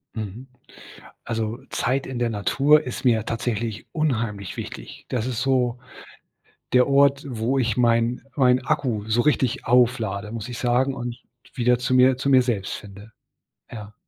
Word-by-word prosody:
Mhm. 110 Hz, +4 st, -6 dB, 0.8 s
Also, 115 Hz, +1 st, -3 dB
äh, -, -, -24 dB
Zeit 135 Hz, +2 st, -1 dB
in 130 Hz, -2 st, -5 dB
der 120 Hz, -1 st, 0 dB
Natur 140 Hz, +8 st, +3 dB
ist 125 Hz, 0 st, -6 dB
mir 115 Hz, -4 st, +3 dB
tatsächlich 115 Hz, -2 st, -3 dB
unheimlich 115 Hz, -, -2 dB
wichtig. -, -, -8 dB
Das 120 Hz, -3 st, -2 dB
ist 125 Hz, -3 st, -3 dB
so 125 Hz, -2 st, +1 dB, 0.9 s
der 125 Hz, 0 st, +5 dB
Ort, 140 Hz, 0 st, +3 dB
wo 120 Hz, +2 st, -1 dB
ich 115 Hz, -4 st, 0 dB
mein 120 Hz, 0 st, +2 dB
mein 130 Hz, -2 st, +3 dB
Akku 130 Hz, -9 st, -1 dB
so 110 Hz, +2 st, +2 dB
richtig 130 Hz, -4 st, 0 dB
auflade, 115 Hz, -5 st, +2 dB
muss 115 Hz, +1 st, -6 dB
ich 120 Hz, -, -6 dB
sagen 125 Hz, +2 st, +1 dB
und 120 Hz, -2 st, -6 dB, 0.3 s
wieder 125 Hz, -2 st, +2 dB
zu 125 Hz, +1 st, -1 dB
mir 130 Hz, 0 st, +5 dB
zu 140 Hz, +1 st, -1 dB
mir 130 Hz, -1 st, +6 dB
selbst 110 Hz, -6 st, -2 dB
finde. 100 Hz, +2 st, -11 dB, 0.6 s
Ja. 105 Hz, -2 st, -9 dB
120 Hz, 160 wpm, -23 LUFS, 110-130 Hz, 0.9 s, mir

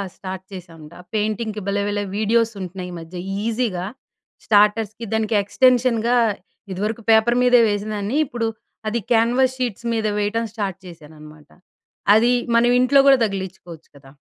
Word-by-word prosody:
Start 190 Hz, -1 st, -7 dB
చేశామండి. 165 Hz, -3 st, -11 dB, 0.2 s
పెయింటింగ్‍కి 215 Hz, 0 st, -2 dB
భలే 200 Hz, 0 st, 0 dB
భలే 205 Hz, 0 st, -2 dB
వీడియోస్ 225 Hz, +2 st, +2 dB
ఉంటున్నయి 185 Hz, 0 st, -6 dB
ఈ -, -, -7 dB
మధ్య. 165 Hz, +2 st, -10 dB, 0.3 s
ఈజీగా 220 Hz, -5 st, -2 dB, 0.6 s
స్టార్టర్స్‌కి 215 Hz, +1 st, +2 dB
దానికి 220 Hz, 0 st, 0 dB
ఎక్స్‌టెన్షన్ 250 Hz, +2 st, +3 dB, 0.7 s
ఇదివరకు 210 Hz, +5 st, -3 dB
పేపర్ 225 Hz, +2 st, +4 dB
మీదే 250 Hz, -1 st, +5 dB
వేసిందాన్ని. 205 Hz, +3 st, -2 dB
ఇప్పుడు 240 Hz, -4 st, -3 dB, 0.4 s
అది 235 Hz, +2 st, -1 dB
క్యాన్వాస్ 245 Hz, +3 st, +3 dB
షీట్స్ 240 Hz, -3 st, -4 dB
మీద 220 Hz, -1 st, -1 dB
వేయడం 210 Hz, +3 st, -1 dB
స్టార్ట్ 200 Hz, -5 st, -3 dB
చేశాననమాట. 155 Hz, -3 st, -14 dB, 0.6 s
అది 230 Hz, +3 st, +4 dB, 0.2 s
మనం 235 Hz, +1 st, +4 dB
ఇంట్లో 255 Hz, +2 st, +4 dB
కూడా 275 Hz, -1 st, +7 dB
తగిలించుకోవచ్చు 190 Hz, -5 st, -7 dB
కదా! 135 Hz, -1 st, -17 dB
215 Hz, 130 wpm, -21 LUFS, 190-235 Hz, 0.7 s, కూడా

